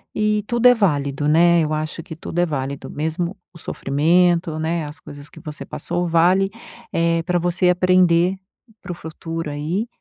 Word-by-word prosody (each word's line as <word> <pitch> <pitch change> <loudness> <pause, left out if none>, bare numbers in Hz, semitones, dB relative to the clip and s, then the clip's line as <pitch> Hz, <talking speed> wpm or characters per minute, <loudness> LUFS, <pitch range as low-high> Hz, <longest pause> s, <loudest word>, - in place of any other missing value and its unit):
E 210 0 +1
tudo 240 0 -1
é 250 - +9
válido, 145 - 0
né? 170 +2 +5
Eu 155 0 -1
acho 155 +1 -3
que 165 0 -9
tudo 165 +2 -5
é 175 - +4
válido, 140 -3 -4
mesmo 170 +6 -3 0.2
o - - -13
sofrimento, 165 +4 +1
né, 160 +1 -1
as 150 - -10
coisas 145 +1 -11
que - - -14
você 150 -3 -8
passou 175 +3 -3
vale, 180 +4 +3 0.4
eh, 165 0 +1
pra 180 0 0
você 175 +1 +1
aprender 180 -1 +3 0.5
para - - -7
o - - -5
futuro 165 -1 -6
aí 165 +10 -2
170 Hz, 175 wpm, -21 LUFS, 155-180 Hz, 0.5 s, é